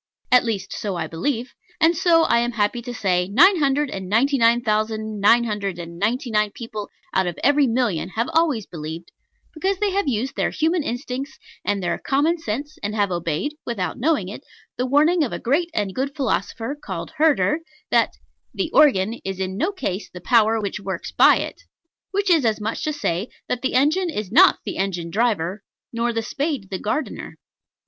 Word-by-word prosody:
At 250 0 +6
least 200 -4 -3
so 200 -3 -3
I 170 -2 -2
believe; 225 - -3 0.3
and 335 +1 +4
so, 330 -1 +4
I 235 - +3
am 240 +1 -1
happy 220 +2 0
to 245 +1 -6
say, 180 -6 0
nine 345 - +6
hundred 285 0 +1
and 190 -1 -6
ninety 270 +6 +2
nine 235 +1 +4
thousand 215 -1 -1
nine 230 +4 +5
hundred 205 -5 -3
and 170 0 -8
ninety 240 - -1
nine 210 -1 +2
people 215 -3 -6 0.2
out 190 -1 +2
of 175 - -4
every 285 -1 +4
million 225 -8 0
have 230 +2 0
always 310 -10 +2
believed, 160 +1 -7 0.4
because 380 +5 -1
they 415 0 0
have 395 -3 0
used 255 +1 -1
their - - +1
human 325 +2 +1
instincts 265 +2 -4 0.3
and 200 -2 -1
their 175 - -1
common 305 +5 +1
sense, 290 +4 -5
and 205 +1 -3
have 205 -3 +1
obeyed 170 - -2
(without 205 -7 -3
knowing 280 - +1
it) 200 - -8 0.3
the 250 - -1
warning 305 +5 +4
of 260 - -2
a - - -2
great 315 +8 0
and 205 -8 -2
good 275 +5 -3
philosopher 240 -2 -2
called 185 -4 -5
Herder, 305 0 +3 0.3
that - - +3 0.4
"The 345 -4 -2
organ 230 -7 +4
is 190 -1 -4
in 190 0 -2
no 330 - 0
case 210 - -4
the 180 - -10
power 225 +2 +3
which 205 -1 -3
works 190 -3 -5
by - - +6
it;" - - -5 0.5
which 400 -1 0
is 325 -5 +4
as 220 -2 +1
much 220 +7 -3
as 305 - -1
to - - -11
say, 180 -1 -1 0.2
that 245 - -2
the 265 - -1
engine 315 +8 +3
is 210 - -4
not 360 +10 +6
the - - -4
engine 180 -3 -2
driver, 205 -3 0 0.3
nor 235 +1 0
the 225 -1 -2
spade 275 -4 -3
the 190 - -3
gardener. 300 +9 -3
230 Hz, 195 wpm, -22 LUFS, 200-290 Hz, 0.5 s, At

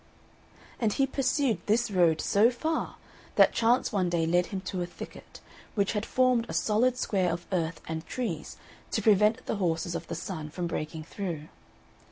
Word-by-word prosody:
And 220 -3 +1
he 275 - +2
pursued 265 - +1
this 220 +1 +2
road 170 -4 +3
so 210 +4 +4
far 315 +6 -2 0.4
that - - +6
chance 235 +2 +2
one 190 -5 +1
day 170 -1 +1
led 175 +2 +2
him 195 - -4
to 185 -1 -4
a 175 - -2
thicket, 175 - -11 0.3
which 200 -1 +1
had 210 0 -2
formed 255 -2 +2
a - - -4
solid 240 +4 +2
square 190 -7 +1
of 170 +1 -4
earth 165 -3 -1
and 160 0 -3
trees 190 -12 -4 0.4
to 220 - 0
prevent 215 +3 +4
the - - -2
horses 170 -2 0
of - - -5
the - - -4
Sun 155 -6 -5
from 175 +3 -4
breaking 155 -1 -4
through. 165 -3 -5
195 Hz, 180 wpm, -28 LUFS, 170-230 Hz, 0.4 s, that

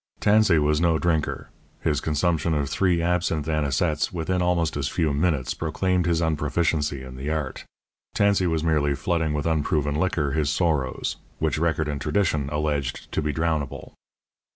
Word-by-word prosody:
Tansey 105 -4 +4
was 75 +1 +2
no 85 -2 +3
drinker; 80 -2 -1 0.3
his 75 -2 0
consumption 80 +1 0
of 70 -1 0
three 85 +3 +1
absinthe 85 -3 0
anisettes 75 0 0
within 90 +1 -1
almost 85 -2 +1
as 70 -1 -1
few 80 -1 0
minutes 75 -4 0
proclaimed 90 +3 0
his 85 -1 +1
unproficiency 75 -2 0
in 65 0 -9
the 70 +3 -4
art; 75 -4 -3 0.5
Tansey 100 -3 +3
was 80 -2 0
merely 75 -3 +2
flooding 80 +2 0
with 75 - -2
unproven 75 -2 0
liquor 75 -3 0
his 75 0 0
sorrows; 75 -5 0 0.2
which 80 -1 0
record 80 -2 0
and 70 -2 -3
tradition 75 -3 0
alleged 75 -3 -2
to - - 0
be 75 0 -1
drownable. 80 -3 -2
80 Hz, 155 wpm, -24 LUFS, 75-85 Hz, 0.5 s, Tansey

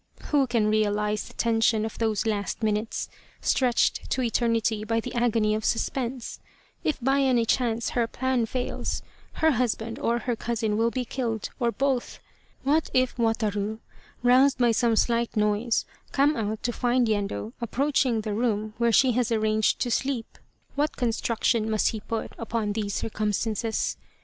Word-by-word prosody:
Who 280 -3 +3
can 230 -3 +1
realize 210 0 +1
the - - -14
tension 225 -1 +2
of 220 - -7
those 220 -1 0
last 210 +1 -2
minutes, 215 +1 -1 0.3
stretched 250 -3 +1
to 260 - 0
eternity 230 -2 +1
by 225 +1 0
the 245 +2 -6
agony 225 -3 +2
of 215 0 -2
suspense? 245 +2 -2 0.4
If 310 - 0
by 270 +3 +2
any 250 -4 +3
chance 235 -1 0
her 235 -2 +1
plan 255 -1 0
fails, 250 +2 -3 0.3
her 320 0 +3
husband 230 -3 -1
or 235 +1 +1
her 240 +1 -2
cousin 220 -2 -1
will 225 +2 +2
be 250 +1 -3
killed, 230 -4 -3
or 235 -2 +2
both. 265 0 -1 0.4
What 300 +4 +2
if 255 -1 +2
Wataru, 220 -2 0 0.5
roused 260 +3 +5
by 240 -2 +4
some 230 0 +2
slight 235 0 +1
noise, 210 +2 +1 0.3
come 285 +2 +3
out 215 -2 -3
to 240 - -1
find 245 0 +2
Yendo 195 - -2
approaching 255 -1 +1
the 215 -1 -3
room 215 -1 -1
where 235 0 +3
she 255 +3 +5
has 240 -1 0
arranged, 215 -1 +2
to 245 - 0
sleep; 260 -1 -2 0.3
what 295 +2 -1
construction 230 -1 0
must 215 -1 +2
he 220 - -4
put 225 +1 -4
upon 225 -2 -2
these 205 -2 -2
circumstances. 215 +1 -1
230 Hz, 160 wpm, -26 LUFS, 215-245 Hz, 0.5 s, roused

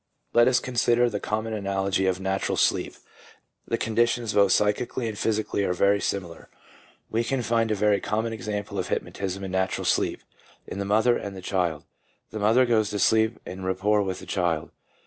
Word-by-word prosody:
Let 120 0 +6
us 130 -1 +4
consider 120 -1 +2
the 105 - -2
common 110 +2 -2
analogy 95 -2 0
of 95 0 0
natural 95 0 -1
sleep. - - +1 0.7
The - - 0
conditions 115 0 0
both 100 -2 +4
psychically 110 +4 +1
and 110 - -4
physi 110 +1 0
cally 100 - -1
are 90 - 0
very 100 +2 +3
similar. 90 -4 -4 0.6
We 115 +1 +1
can 125 +1 -1
find 115 -1 +1
a 110 - +1
very 105 0 +2
common 110 +2 -1
example 105 -2 -4
of 90 - -2
hypnotism 95 0 -3
in 95 - -5
natural 95 0 -1
sleep, - - +1 0.4
in 100 - -6
the 100 - -2
mother 110 +4 +3
and 100 -1 -6
the - - -7
child. 85 -5 -1 0.5
The 110 - -5
mother 115 +5 +4
goes 110 -3 +2
to 105 - -3
sleep 110 +2 +3
en 95 +1 -7
rapport 95 +3 +1
with 95 -2 -2
the - - -10
child. 85 -5 -1
105 Hz, 185 wpm, -25 LUFS, 95-115 Hz, 0.7 s, Let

